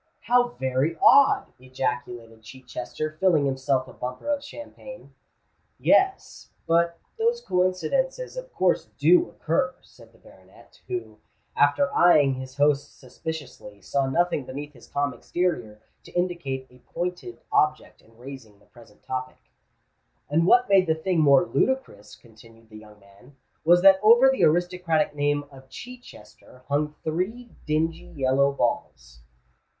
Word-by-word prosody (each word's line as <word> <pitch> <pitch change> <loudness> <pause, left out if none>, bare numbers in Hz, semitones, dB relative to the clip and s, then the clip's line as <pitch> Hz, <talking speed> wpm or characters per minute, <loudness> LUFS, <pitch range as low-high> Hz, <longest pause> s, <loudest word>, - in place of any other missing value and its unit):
"How 245 0 +3
very 130 +5 -1
odd!" 280 -1 +5
ejaculated 125 -3 -5
Chichester, 130 +5 -7
filling 170 -7 +3
himself 130 -1 -1
a - - -13
bumper 125 - -7
of 290 -1 -1
champagne. - - -11 0.6
"Yes—but 170 - 0 0.2
those 470 +1 +1
coincidences - - -1
of - - -8
course - - 0
do 355 0 +4
occur," 265 -1 -1
said - - -19
the - - -24
baronet, - - -20
who, 365 -1 -6 0.4
after 280 -1 +2
eyeing 150 -6 +5
his 130 +1 -8
host 145 0 +1
suspiciously, 130 -6 -8
saw 135 +7 -1
nothing 170 +1 0
beneath 145 +3 -8
his 120 - -17
calm 140 -2 -2
exterior 120 -14 -3 0.2
to - - -16
indicate 170 -7 -2
a 125 - -19
pointed 180 - -6
object 150 0 0
in 115 0 -25
raising 125 -4 -11
the 100 - -26
present 105 0 -20
topic. 130 0 -7 0.8
"And 165 +3 +2
what 245 +4 +5
made 195 -2 +4
the 160 - +2
thing 170 +2 -1
more 150 +3 +5
ludicrous," 260 - -2
continued 115 0 -20
the 110 - -11
young 105 -1 -17
man, 100 +7 -21 0.3
"was 175 +2 +4
that 195 -1 +7
over 240 +5 +6
the 265 - +2
aristocratic 175 -2 +1
name 145 0 0
of 135 -1 -16
Chichester 130 - -13
hung 150 +1 -1
three 195 +10 -3 0.2
dingy 160 +2 -1
yellow 140 0 +2
balls." 60 - -3
150 Hz, 135 wpm, -25 LUFS, 130-185 Hz, 0.8 s, that